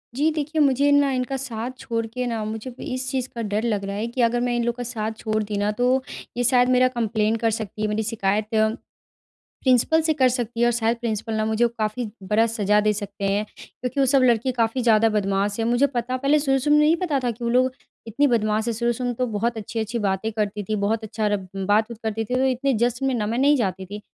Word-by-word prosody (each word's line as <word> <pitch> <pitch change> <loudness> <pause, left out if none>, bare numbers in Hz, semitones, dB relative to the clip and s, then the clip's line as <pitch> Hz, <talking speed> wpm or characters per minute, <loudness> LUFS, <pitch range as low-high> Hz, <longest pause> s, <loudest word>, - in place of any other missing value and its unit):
जी 295 +4 +2
देखिए, 310 +1 -2
मुझे 280 0 +3
ना 285 -1 +4
इनका 260 +1 -2
साथ 245 -2 -5
छोड़ 230 -3 -2
के 250 +3 -4
ना, 225 -2 -2
मुझे 220 +3 -5
अब 245 - -12
इस 255 0 -4
चीज़ 260 -1 -2
का 235 - -3
डर 210 0 -1
लग 210 -4 -1
रहा 200 0 -4
है 215 +3 -2
कि 240 +2 -2
अगर 235 +1 +2
मैं 245 0 0
इन 240 - 0
लोगों 235 0 -1
का 245 - -3
साथ 220 -3 -3
छोड़ 215 0 -1
दी 205 0 -4
ना 205 +1 +1
तो 250 +4 +1 0.4
ये 245 - +1
शायद 250 0 +4
मेरा 255 0 +4
कंप्लेन 225 -3 0
कर 225 0 +1
सकती 215 -1 -5
हैं 215 - 0
मेरी 215 +1 -1
शिकायत 210 -1 0 1.2
प्रिंसिपल 260 +5 +4
से 315 0 +1
कर 260 -1 +5
सकती 240 -2 -3
हैं 240 - +4
और - - +3
शायद 230 0 +1
प्रिंसिपल 225 -1 -3
ना 215 0 0
मुझे 220 +2 +2
काफ़ी 220 +3 -2 0.2
बड़ा 220 +2 +4
सज़ा 210 -2 +2
दे 210 0 +2
सकते 200 -1 -5
हैं। 205 +1 +1 0.2
क्योंकि 255 +2 -5
वो 275 - +4
सब 265 +1 +4
लड़के 240 +1 +3
काफ़ी 240 +1 0
ज़्यादा 225 -1 +4
बदमाश 200 0 0
है। 225 - 0
मुझे 245 +4 +3
पता 255 -1 -2
पहले 280 +3 +2
शुरू-शुरू 275 +1 +2
में - - +5
नहीं 310 +2 +4
पता 325 -6 0
था 245 - +1
कि 235 +2 -9
वो 235 - 0
लोग 255 +2 +3 0.4
इतनी 275 +7 +2
बदमाश 220 -2 +1
हैं 235 - 0
शुरू-शुरू 235 +2 -1
में 245 - -2
तो 255 - 0
बहुत 230 +2 -1
अच्छी-अच्छी 220 +2 -3
बातें 195 +3 -1
करती 210 -1 -2
थी 215 - +1
बहुत 215 +2 -1
अच्छा 215 0 -2
र 205 - +2 0.2
बात-वूत 210 +4 0
करती 220 0 -2
थी 250 - -2
तो 260 - +2
इतने 265 +1 +1
जश्न 245 +2 +1
में 265 - +1
ना 215 -3 -1
मैं 230 +3 -1
नहीं 285 +3 +4
जाती 190 -5 -2
थी। 205 +3 -7
235 Hz, 245 wpm, -23 LUFS, 215-255 Hz, 1.2 s, कर